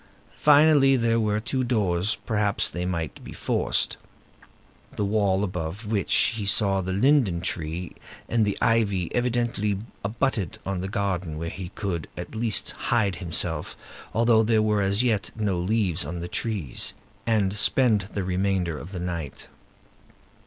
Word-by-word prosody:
Finally, 145 -2 +6
there 115 -2 +2
were 105 -1 +1
two 130 +4 -1
doors; 105 -5 +1
perhaps 105 -3 0
they 90 0 -3
might 85 -3 -4
be - - -9
forced. - - 0 1.0
The 105 - 0
wall 100 -2 +2
above 90 +2 -4
which 105 -2 -1 0.3
he 105 -3 -3
saw 100 -2 +3
the 95 0 -3
linden 105 - +3
tree 85 0 -3 0.4
and 115 -2 +2
the 100 -2 0
ivy 100 -6 +2
evidently 120 -4 0 0.3
abutted 105 - -1
on 95 -2 -2
a - - -2
garden 95 -5 -2
where 85 +1 -4
he 90 -2 -6
could, 90 -7 -3
at - - -7
least, 110 -1 0
hide 105 -6 0
himself, 80 -3 -3 0.3
although 115 +1 +4
there 110 -1 +3
were 105 -1 +2
as 100 +4 +2
yet 110 -5 +1
no 105 -5 -1
leaves 95 -3 +1
on 85 +4 -5
the 85 - -4
trees, 95 - -2 0.3
and 105 -4 +2
spend 105 -1 +3
the 100 - -1
remainder 90 -3 0
of 90 +5 -10
the 90 - -4
night. 85 -4 -5
100 Hz, 150 wpm, -25 LUFS, 90-110 Hz, 1.0 s, Finally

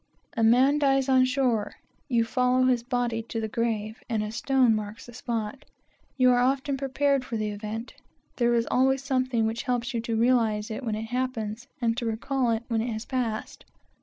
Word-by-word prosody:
A 230 - -1
man 260 +6 +5
dies 270 -2 +2
on 260 -1 +5
shore 255 -5 0 0.3
you 235 -5 +2
follow 250 +2 +2
his 250 -2 +3
body 240 -2 -1
to 225 0 -5
the 220 - -2
grave, 220 -1 -2
and 220 -3 0
a 210 - -4
stone 255 0 +3
marks 215 0 -4
the 240 - -12
spot. 230 +2 -4 0.5
You 255 -1 +5
are 245 - +3
often 270 +2 +1
prepared 275 0 +1
for 235 -2 -4
the 215 -1 -1
event. 215 +3 -6 0.4
There 240 -1 +3
is 230 0 +1
always 265 +1 +2
something 255 -4 0
which 225 +1 -2
helps 245 0 -2
you 230 - -1
to 230 0 -2
realize 225 -3 +2
it 220 - -5
when 220 -3 -1
it 220 +1 -5
happens, 240 -2 -3
and 230 -2 +1
to 235 - -2
recall 245 +3 -1
it 225 0 0
when 230 -2 0
it 235 +1 -2
has 220 +1 -5
passed. 240 -5 -3
240 Hz, 195 wpm, -26 LUFS, 225-255 Hz, 0.5 s, man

